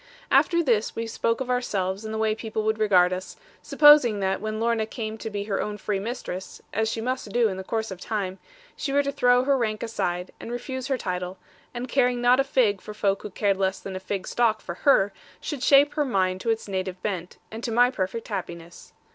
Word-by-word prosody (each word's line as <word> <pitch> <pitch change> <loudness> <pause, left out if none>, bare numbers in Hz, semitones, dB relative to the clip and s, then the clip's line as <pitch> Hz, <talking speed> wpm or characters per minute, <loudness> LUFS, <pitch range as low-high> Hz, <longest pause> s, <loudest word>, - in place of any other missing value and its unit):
After 340 -1 +4
this, 230 -7 +1
we 230 - -2
spoke 230 +1 -1
of 255 - -4
ourselves 200 -5 -1
and 220 - -5
the 220 - -3
way 220 -1 +1
people 220 0 -4
would 220 0 0
regard 185 -4 +4
us, 185 +1 -6 0.2
supposing 295 -8 +6
that 190 0 -1
when 215 0 -3
Lorna 230 -1 +1
came 220 -1 -5
to 220 - -5
be 205 -1 -3
her 200 -1 -2
own 210 0 -4
free 205 0 -2
mistress 195 -4 -6
(as 220 +1 +1
she 225 - -3
must 255 -2 -3
do 240 0 +3
in 190 - -4
the 190 - -5
course 220 +1 -3
of 185 -1 -8
time) 195 -3 -3 0.4
she 280 - -3
were 285 +1 +3
to 280 - -1
throw 245 -2 +3
her 280 +1 +3
rank 220 -4 -1
aside, 180 -5 -2
and 230 - -7
refuse 255 +1 -4
her 270 - 0
title, 180 -3 -4 0.3
and 245 +1 -5
caring 250 -1 +2
not 245 +2 +4
a - - +5
fig 230 -8 +1
for 210 - -9
folk 200 -2 0
who - - -6
cared 200 0 0
less 190 0 0
than 195 -1 -7
a - - -3
fig 190 0 -4
stalk 225 -3 +1
for 175 - -6 0.2
her, 200 -7 +4 0.3
should 295 -5 -5
shape 280 +2 +5
her 300 - +1
mind 190 -7 0
to 230 - -2
its 225 -1 -1
native 185 -1 -3
bent, 180 -4 -4
and 225 +2 -7
to 235 - -2
my 245 +2 +4
perfect 195 0 -3
happiness. 170 -4 -7
220 Hz, 230 wpm, -25 LUFS, 195-245 Hz, 0.4 s, supposing